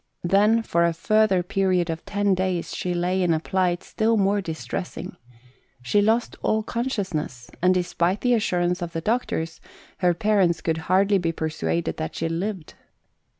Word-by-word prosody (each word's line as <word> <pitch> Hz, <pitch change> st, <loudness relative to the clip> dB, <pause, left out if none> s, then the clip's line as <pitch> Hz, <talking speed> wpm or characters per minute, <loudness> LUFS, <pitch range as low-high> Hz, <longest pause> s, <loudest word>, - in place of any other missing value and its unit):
Then 210 Hz, +5 st, +3 dB
for 170 Hz, -5 st, +1 dB
a 170 Hz, -1 st, +2 dB
further 195 Hz, +1 st, +2 dB
period 185 Hz, -2 st, +1 dB
of 160 Hz, +1 st, -6 dB
ten 205 Hz, -1 st, +1 dB
days 185 Hz, -2 st, -1 dB
she 180 Hz, -, -2 dB
lay 180 Hz, +2 st, 0 dB
in 170 Hz, -3 st, +3 dB
a -, -, 0 dB
plight 180 Hz, +1 st, 0 dB
still 225 Hz, +1 st, +1 dB
more 200 Hz, 0 st, +2 dB
distressing. 170 Hz, +1 st, -5 dB, 0.7 s
She 205 Hz, +12 st, +2 dB
lost 225 Hz, +3 st, +1 dB
all 220 Hz, 0 st, +1 dB
consciousness, 190 Hz, -, -3 dB
and, 180 Hz, +1 st, +4 dB
despite 180 Hz, +1 st, 0 dB
the 245 Hz, -1 st, +3 dB
assurance 180 Hz, -5 st, +1 dB
of 170 Hz, -1 st, -4 dB
the 165 Hz, -, -3 dB
doctors, 165 Hz, -7 st, -2 dB, 0.4 s
her 180 Hz, -2 st, +3 dB
parents 190 Hz, -5 st, +2 dB
could 160 Hz, 0 st, -1 dB
hardly 195 Hz, +2 st, +4 dB
be 165 Hz, -2 st, 0 dB
persuaded 160 Hz, +1 st, -2 dB
that 160 Hz, -, -4 dB
she 165 Hz, -, -1 dB
lived. 175 Hz, +1 st, -4 dB
180 Hz, 160 wpm, -24 LUFS, 170-205 Hz, 0.7 s, and